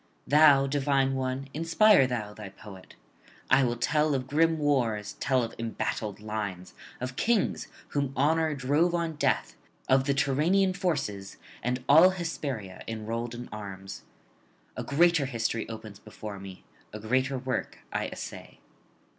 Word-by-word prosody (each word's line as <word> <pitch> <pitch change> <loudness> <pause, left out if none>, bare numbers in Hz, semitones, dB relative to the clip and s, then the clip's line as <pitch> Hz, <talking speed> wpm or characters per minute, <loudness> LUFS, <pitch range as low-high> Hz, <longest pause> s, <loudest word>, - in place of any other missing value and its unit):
Thou, 145 -2 +6
divine 135 -1 +1
one, 130 +1 -2
inspire 165 0 +5
thou 110 -5 -4
thy 105 -2 -9
poet. 95 -1 -13 0.6
I 135 +1 +6
will 120 -1 0
tell 150 +4 +1
of 130 -1 -2
grim 160 +4 +2
wars, 115 -8 0
tell 130 -3 +2
of 115 - -5
embattled 110 -2 -3
lines, 105 -4 -5 0.3
of 125 0 -5
kings 225 - +1 0.2
whom 140 -2 -1
honour 155 +2 +2
drove 145 +6 +1
on 170 -1 -1
death, - - 0 0.3
of 130 0 +4
the 140 -1 +1
Tyrrhenian 170 +8 +2
forces, 140 - -2 0.2
and 125 +1 -2
all 160 +6 +8
Hesperia 140 - -5
enrolled 115 +2 -4
in 120 +1 -7
arms. 100 -2 -8 0.7
A - - -4
greater 165 -1 +3
history 115 -3 -2
opens 110 -3 -9
before 105 -2 -8
me, 95 -1 -10 0.3
a 105 - -7
greater 130 +5 0
work 130 0 -3 0.2
I - - -1
essay. - - -8
130 Hz, 140 wpm, -28 LUFS, 110-150 Hz, 0.7 s, all